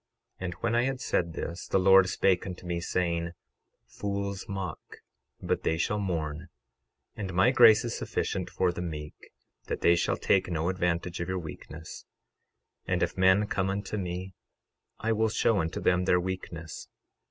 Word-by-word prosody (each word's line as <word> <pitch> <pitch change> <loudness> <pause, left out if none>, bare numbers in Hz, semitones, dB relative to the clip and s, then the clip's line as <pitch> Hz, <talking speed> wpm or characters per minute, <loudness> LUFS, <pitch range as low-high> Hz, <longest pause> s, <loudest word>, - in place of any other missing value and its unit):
12:26 95 - -4
And 90 - -3
when 115 0 -1
I 120 - +4
had 135 -1 -2
said 85 - 0
this, 85 +2 -5
the - - +2
Lord 95 0 +6
spake 95 0 +2
unto 90 -1 -7
me, 85 -1 -2
saying: 85 -1 -1 0.5
Fools 100 +6 -4
mock, 95 -2 -4 0.6
but - - -1
they 80 - 0
shall 105 +5 0
mourn; 80 -4 -3 0.7
and 100 -3 -4
my 105 +8 +5
grace 115 -3 +7
is 115 - -3
sufficient - - -2
for 90 -1 +1
the 85 - -5
meek, 75 -3 -5 0.5
that - - -4
they 85 - +5
shall 85 - 0
take 95 -2 +2
no 85 0 0
advantage 90 -1 -1
of 85 +1 -3
your 95 - -1
weakness; 80 -1 -8 0.8
12:27 - - 0
And - - +2
if - - -1
men 95 +2 +4
come 95 -2 -1
unto 100 +2 -3
me 90 -1 -4 0.6
I 115 - -1
will 110 0 +2
show 110 -1 +2
unto 80 -1 -2
them 90 0 +2
their 90 -1 +4
weakness. 90 -3 -5
90 Hz, 175 wpm, -29 LUFS, 85-100 Hz, 0.8 s, grace